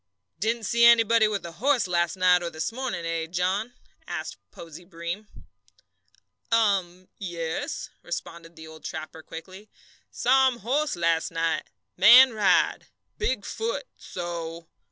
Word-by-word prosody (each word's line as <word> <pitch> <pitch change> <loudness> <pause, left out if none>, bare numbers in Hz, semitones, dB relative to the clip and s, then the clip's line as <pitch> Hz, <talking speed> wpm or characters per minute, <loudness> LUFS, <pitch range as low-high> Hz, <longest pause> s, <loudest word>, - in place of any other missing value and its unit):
"Didn't 225 +4 -1
see 235 +2 +1
anybody 230 -1 +6
with 205 -4 -3
a 170 - -7
horse 250 +8 +1
last 175 0 0
night 180 -1 +4
or 170 - -3
this 160 +5 -4
morning, 240 -8 -4
eh, 165 -1 -2
John?" 190 +7 -2 0.3
asked - - -5
Posey 165 +1 -11
Breem. 175 +4 -6 1.2
"Um, 190 -5 +1
yes," 170 -4 -4
responded 170 -1 -7
the 160 -1 -11
old 160 0 -13
trapper, 160 0 -7
quickly. 185 +6 -11 0.4
"Saw 265 +2 +3
um 255 -2 -1
horse 290 +7 0
las' 165 -1 +1
night 165 -1 -1 0.3
man 240 +7 +8
ride 210 -3 +2 0.3
big 260 - -1
foot 465 +3 -3
so." 170 -2 -6
185 Hz, 135 wpm, -26 LUFS, 165-230 Hz, 1.2 s, man